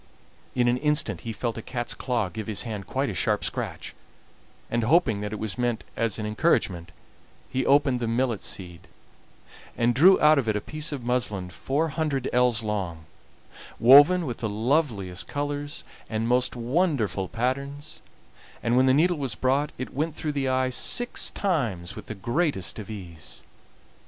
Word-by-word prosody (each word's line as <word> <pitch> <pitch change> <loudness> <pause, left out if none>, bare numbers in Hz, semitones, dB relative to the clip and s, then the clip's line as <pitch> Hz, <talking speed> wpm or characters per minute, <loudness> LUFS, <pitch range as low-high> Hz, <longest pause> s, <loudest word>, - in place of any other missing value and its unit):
In 120 -1 +2
an 120 +1 +3
instant 145 - +1
he 115 - -5
felt 115 +1 -3
a - - -6
cat's 120 +1 -4
claw 120 -6 -1
give 110 +1 -6
his 110 -2 0
hand 105 -5 -6
quite - - -1
a - - -6
sharp - - 0
scratch, - - -4 0.7
and 120 0 -1
hoping 115 -8 +3
that 105 0 -4
it 105 - -4
was 110 +2 -4
meant 120 -3 0
as 115 -3 -1
an 110 - -4
encouragement 105 - 0 0.6
he 130 0 -1
opened 140 -3 +4
the 120 - -2
millet 115 -1 0
seed, 90 -2 -5 0.9
and 120 +1 +2
drew 180 +10 +6
out 150 -1 +6
of 115 -5 -1
it 105 - +1
a - - +1
piece 155 +8 -4
of 140 -4 -5
muslin 105 -7 -1
four 140 - -1
hundred 150 -4 -1
ells 125 -2 +3
long, 95 -7 -3 0.7
woven 145 +8 +7
with 120 -5 -4
the 110 - -3
loveliest 110 - -1
colors 145 0 -3 0.3
and 110 0 -1
most 125 +1 +2
wonderful 120 - 0
patterns; 140 +6 -3 0.6
and 120 +1 +2
when 130 +1 +4
the 130 - +5
needle 175 +3 +3
was 135 -5 -2
brought 135 +3 +1
it 130 - -6
went 155 +2 -2
through 155 - -3
the 140 -2 -1
eye 130 0 +1
six 245 - +1
times 120 - -2
with - - -9
the 110 - -5
greatest 115 - -1
ease! 95 -6 -8
120 Hz, 170 wpm, -26 LUFS, 105-145 Hz, 0.9 s, woven